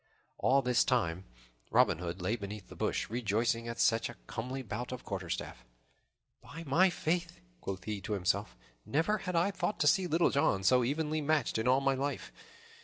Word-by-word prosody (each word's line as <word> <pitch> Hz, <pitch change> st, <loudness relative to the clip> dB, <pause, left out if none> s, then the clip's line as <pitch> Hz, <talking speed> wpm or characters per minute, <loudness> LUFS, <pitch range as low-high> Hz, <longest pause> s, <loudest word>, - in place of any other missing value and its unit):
All 135 Hz, +1 st, +3 dB
this 125 Hz, -1 st, +3 dB
time 95 Hz, -7 st, 0 dB, 0.4 s
Robin -, -, +4 dB
Hood 90 Hz, +1 st, -5 dB
lay 105 Hz, +6 st, +1 dB
beneath 100 Hz, -2 st, -7 dB
the -, -, -11 dB
bush, -, -, -1 dB
rejoicing 115 Hz, +1 st, 0 dB
at 115 Hz, 0 st, -5 dB
such 115 Hz, +1 st, +3 dB
a 120 Hz, -, -9 dB
comely 130 Hz, +3 st, -5 dB
bout 120 Hz, +2 st, -5 dB
of 125 Hz, -, -6 dB
quarterstaff. 90 Hz, -, -5 dB, 0.8 s
"By 165 Hz, -, -9 dB
my 165 Hz, +6 st, +4 dB
faith!" 175 Hz, +1 st, -2 dB, 0.2 s
quoth 95 Hz, -, -5 dB
he 105 Hz, -2 st, -4 dB
to 110 Hz, -, -3 dB
himself, 100 Hz, +2 st, -1 dB, 0.3 s
"never 170 Hz, +9 st, +1 dB
had 180 Hz, -2 st, -4 dB
I 170 Hz, +4 st, +3 dB
thought 205 Hz, +1 st, -2 dB
to -, -, +3 dB
see 185 Hz, +4 st, +4 dB
Little 165 Hz, +1 st, +3 dB
John 95 Hz, -9 st, +2 dB
so 125 Hz, +5 st, +5 dB
evenly 155 Hz, +4 st, -1 dB
matched 145 Hz, -6 st, +1 dB
in 110 Hz, -, -1 dB
all 130 Hz, +2 st, +4 dB
my 135 Hz, 0 st, +2 dB
life. 140 Hz, +2 st, -3 dB
125 Hz, 180 wpm, -32 LUFS, 105-155 Hz, 0.8 s, so